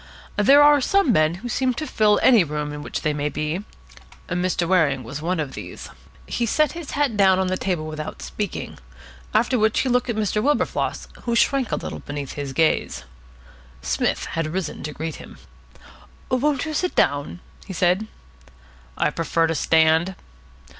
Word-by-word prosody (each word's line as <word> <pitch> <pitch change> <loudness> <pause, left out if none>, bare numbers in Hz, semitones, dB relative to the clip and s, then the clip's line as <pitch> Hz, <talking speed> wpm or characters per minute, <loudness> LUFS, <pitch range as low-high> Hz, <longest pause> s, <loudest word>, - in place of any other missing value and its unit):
There 275 +8 +6
are 290 -1 +6
some 390 0 +3
men 155 -4 +3
who - - -1
seem 255 +1 0
to 310 - -3
fill 210 -6 +3
any 235 -7 +6
room 150 -1 -4
in 150 - -6
which - - -5
they 155 -2 +1
may 145 0 -1
be. 155 +6 -3 0.7
Mr. 180 -1 0
Waring 155 -8 +2
was 140 +6 -7
one 175 +2 -1
of 145 -4 -3
these. - - -8 0.3
He 235 - -2
set 305 +7 +2
his 335 -4 -7
hat 285 -6 +1
down 190 -2 +5
on 190 - +1
the 185 - 0
table 180 -4 -2
without 155 -1 -6
speaking. 205 -4 -5 0.5
After 245 +2 +2
which 220 0 +2
he 265 - -1
looked 250 0 +1
at 235 - 0
Mr. 210 0 0
Wilberfloss, 290 +5 0 0.2
who 235 -1 0
shrank 265 0 +2
a - - +2
little - - -6
beneath 145 -2 -6
his 145 -2 -5
gaze. 135 - +1 0.8
Psmith - - 0
had 165 -1 -1
risen 170 0 -4
to 150 - -4
greet 160 +2 -5
him. - - -12 0.9
"Won't 270 +2 +1
you 310 - -4
sit 360 +4 -1
down?" 145 +5 +1 0.3
he 195 - -6
said. 180 +4 +1 0.9
"I - - +1
prefer 165 +1 0
to 165 - 0
stand." 160 +3 +3
185 Hz, 175 wpm, -23 LUFS, 155-245 Hz, 0.9 s, There